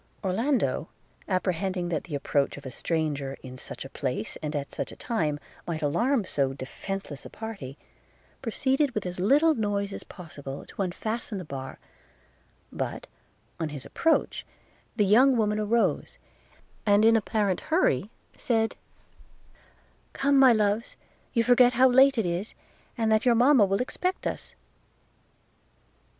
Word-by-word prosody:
Orlando, 195 - 0 0.4
apprehending 185 -1 -1
that 160 -4 -2
the 160 -5 -5
approach 140 0 0
of 140 - -11
a 130 - -6
stranger, 145 -3 -2
in 130 0 -9
such - - -7
a - - -8
place, 130 -5 -3
and 150 -1 -4
at 140 -1 -3
such - - -4
a - - -10
time, 155 -11 -1 0.3
might 160 -3 -3
alarm 235 - +1
so 135 -6 0
defenceless 145 +3 -6
a - - -9
party, 200 - -7 0.6
proceeded 265 +3 0
with 210 - -2
as 180 0 -5
little 290 - +4
noise 205 -4 -1
as - - -7
possible 145 -6 -9
to - - -6
unfasten 215 +4 -3
the 185 - -6
bar; 135 -2 -7 0.9
but, - - -4 0.5
on 160 - -2
his 145 -3 -7
approach, 325 -1 +1 0.5
the 210 -2 +3
young 250 +6 +5
woman 210 -1 +1
arose, 225 +2 0 0.7
and 205 +1 +4
in 225 0 +6
apparent 210 -4 0
hurry 265 - +1 0.3
said, 225 -2 0 1.4
'Come, 280 0 +3
my 265 -2 +8
loves! 215 0 +1 0.4
you 230 -2 +3
forget 245 +1 +5
how 255 +2 +6
late 265 +1 +5
it 225 - +1
is, 175 +5 -3 0.4
and 225 -2 +1
that 220 0 +3
your 245 -2 +4
mama 245 -1 +6
will 195 +4 +1
expect 365 +8 -3
us.' - - -4
205 Hz, 145 wpm, -27 LUFS, 155-235 Hz, 1.4 s, my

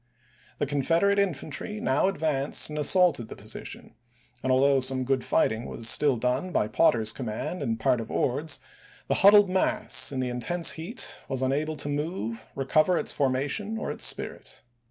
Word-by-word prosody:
The - - -1
Confederate 165 +8 +1
infantry 195 +3 -3
now 140 -2 +1
advanced 155 -8 0
and 150 - -4
as 150 - +3
saulted 175 - +3
the - - -9
position, - - -8 0.5
and 130 - -1
although 135 +1 +3
some 130 0 +1
good 130 0 -1
fight - - +2
ing 110 +2 -5
was 115 - -2
still 140 0 +4
done 125 +9 -1
by 105 - 0
Potter's 110 -8 +2
command 120 +9 -5
and 115 -1 -2
part 125 +1 +1
of 110 - -9
Ord's, 145 +4 -1 0.5
the - - +1
huddled 205 +1 +7
mass, 185 -5 +1
in 135 - -4
the 130 -1 -1
intense 145 +8 +2
heat, 185 +9 -3
was 130 -1 -1
unable 150 +4 -1
to 145 - -3
move, 145 - -4
recover 155 +6 +2
its - - -1
formation, 145 +11 -1
or - - -4
its - - -6
spirit. - - -3
140 Hz, 175 wpm, -26 LUFS, 130-170 Hz, 0.5 s, huddled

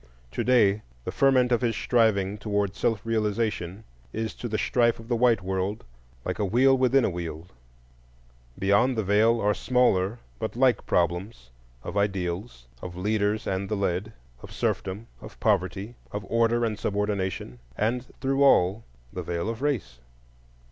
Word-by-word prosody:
To - - -2
day 105 -5 +4 0.2
the - - -2
ferment 130 -2 +3
of 120 - +3
his 115 -2 0
striving 105 -4 +2
toward 100 -2 -1
self 110 0 -1
realization 105 -4 -1 0.3
is 110 -1 -3
to 120 - -6
the 110 -1 -1
strife 120 +1 +2
of 115 - -11
the 120 - +2
white 115 -4 +3
world 95 +2 -2 0.4
like - - -3
a - - +1
wheel 125 +7 +4
within 130 0 +3
a - - +1
wheel: 85 -2 -5 1.1
beyond 100 +6 +2
the 110 - +1
Veil 110 +4 +3
are 105 -1 +2
smaller 115 -4 +2 0.2
but 110 0 -4
like 125 -3 +2
problems 90 - -1 0.3
of - - -5
ideals, 95 - -2 0.2
of 90 -1 -7
leaders 105 +2 0
and 95 0 -2
the 105 - -1
led, 100 +2 -1 0.3
of - - -11
serfdom, 100 +4 -2 0.2
of - - -12
poverty, 100 +1 0 0.2
of 105 0 -5
order 115 +1 +2
and 110 -2 -3
subordination, 100 - -2 0.2
and, 120 +4 0
through 135 +1 +1
all, 100 -4 +4 0.3
the - - -4
Veil 85 +4 -3
of 115 +2 -5
Race. 110 - -2
105 Hz, 155 wpm, -26 LUFS, 95-115 Hz, 1.1 s, day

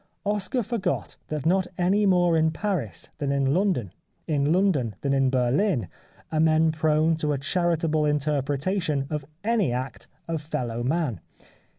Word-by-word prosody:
Oscar 210 +5 0
forgot 210 -5 -2
that 150 -2 -4
not 185 +2 +2
any 195 +3 +2
more 175 -3 +4
in 160 0 +3
Paris 160 - -3
than 140 -2 -1
in 140 -1 +1
London, 165 - 0 0.3
in 145 -1 +1
London 165 - +2
than 140 -1 0
in 135 -1 +3
Berlin, 130 - +1 0.4
are 155 - 0
men 160 0 +4
prone 155 +1 +2
to 150 -2 0
a - - -1
charitable 160 0 +1
interpretation 145 +2 0
of 150 -2 -3 0.2
any 215 - +1
act 130 +2 -4 0.2
of 165 -2 -2
fellow 120 -6 -3
man. 135 -1 -1
155 Hz, 150 wpm, -25 LUFS, 140-180 Hz, 0.4 s, more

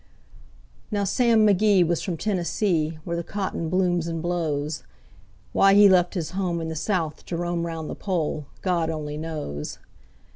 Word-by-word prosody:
Now 205 -2 0
Sam 225 +2 +3
McGee 200 -2 +4
was 170 0 0
from 180 -4 -3
Tennessee, 170 -4 0
where 170 0 -3
the 170 - -2
cotton 190 -4 -3
blooms 175 -2 +1
and 165 -1 -3
blows. 160 -3 -2 0.7
Why 195 0 +5
he 205 0 +8
left 180 0 +4
his 170 -4 -3
home 180 -3 -1
in 165 0 -4
the 160 - -4
South 160 -2 -2
to 170 - -3
roam 175 0 -1
'round 165 -2 -5
the - - -4
Pole, 160 -6 -2 0.2
God 175 -3 +1
only 150 -2 -4
knows. 150 - -5
170 Hz, 160 wpm, -25 LUFS, 160-190 Hz, 0.7 s, he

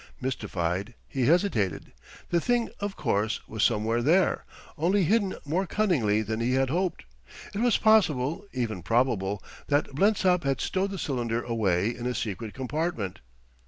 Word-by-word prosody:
Mystified, 100 -5 -2
he 130 -3 0
hesitated. 150 - +1 0.4
The 170 -1 +2
thing, 240 +2 +1
of 205 -1 -3
course, 105 +2 0
was 110 -1 -4
somewhere 115 +1 +2
there, 170 +9 +3 0.3
only 185 +5 +2
hidden 200 +2 +2
more 180 +6 0
cunningly 125 - +2
than 110 +1 -3
he 120 +2 +1
had 135 0 +2
hoped. 180 +2 -1 0.5
It 200 - -3
was 240 -2 +4
possible, 165 -10 +3
even 115 -7 -2
probable, 105 -1 0 0.2
that 145 -1 +1
Blensop 185 +1 +3
had 135 -2 0
stowed 195 +1 0
the 195 - -5
cylinder 120 -7 -2
away 110 -3 +1
in 120 +1 -4
a 125 - -2
secret 110 0 -4
compartment. 130 - -3
130 Hz, 150 wpm, -27 LUFS, 110-180 Hz, 0.5 s, was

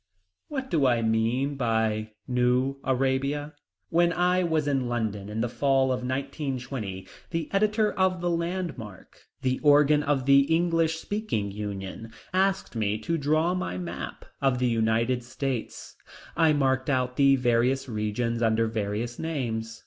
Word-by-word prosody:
What 265 -3 -5
do 145 -5 +3
I 120 -2 +2
mean 115 +5 +1
by 110 -4 0
New 125 +2 +1
Arabia? 135 +3 0 0.4
When 170 +1 +3
I 180 +2 +2
was 160 -3 0
in 135 -4 0
London 105 -4 -2
in 110 +1 -3
the 120 - +1
fall 135 +1 +2
of 125 - 0
1920 130 - -4 0.2
the 165 -2 -2
editor 215 +1 +2
of 185 -1 +1
The 175 0 0
Landmark, 170 - -5 0.2
the 130 0 0
organ 150 0 +5
of 140 -3 0
The 140 0 +7
English 165 -1 +2
Speaking 165 - -3
Union, 100 +1 -6 0.2
asked 190 -5 +1
me 105 -1 0
to 140 +10 -2
draw 155 +4 +2
my 180 - -3
map 90 - -6 0.2
of 135 -2 +2
the 125 0 +1
United 115 +2 +1
States. 130 -1 -4 0.4
I 160 -1 +4
marked 135 -2 +1
out 125 -2 0
the 140 0 +5
various 125 +1 +1
regions 115 +1 -2
under 115 0 +2
various 110 +2 -3
names. 115 -8 -3
130 Hz, 145 wpm, -27 LUFS, 115-155 Hz, 0.4 s, The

